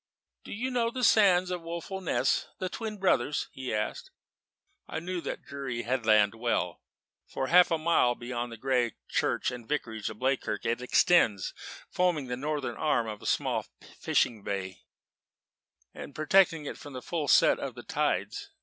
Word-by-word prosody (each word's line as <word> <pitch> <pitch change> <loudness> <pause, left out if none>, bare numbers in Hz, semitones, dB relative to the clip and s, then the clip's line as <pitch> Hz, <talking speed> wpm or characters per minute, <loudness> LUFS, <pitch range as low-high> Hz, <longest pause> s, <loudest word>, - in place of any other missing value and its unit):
"Do - - -10
you 250 +5 -3
know 235 -2 +1
the 250 +1 -4
sands 185 -5 +5
by 180 - -1
Woeful 170 +3 -6
Ness 180 - +1
the 185 - -3
Twin 215 +1 -5
Brothers?" 145 -8 +1
he 130 -1 -6
asked. 105 0 -3 0.8
I - - -4
knew 175 +1 -4
that - - -5
dreary 135 -4 -5
headland 110 -4 +3
well. 115 -7 -1 0.5
For 135 - -3
half 180 +1 +7
a 165 - +2
mile 155 -6 +3
beyond 120 0 -4
the 115 - -8
grey 125 -1 0
Church - - 0
and 120 -2 -9
Vicarage 110 -8 -2
of 110 - -9
Bleakirk 130 +3 -1
it 115 +2 0
extends, 125 - +3 0.4
forming 175 -6 +1
the 125 - -1
northern 145 +1 -3
arm 150 -7 +1
of 105 -1 -6
the - - -8
small - - 0 0.3
fishing 110 -4 +1
bay, 95 -2 -4 1.1
and 145 - -9
protecting 165 0 +3
it - - -6
from 145 - -10
the 130 -1 -7
full 155 +1 -2
set - - +5
of - - -5
the - - -9
tides. - - -1
140 Hz, 165 wpm, -29 LUFS, 120-175 Hz, 1.1 s, half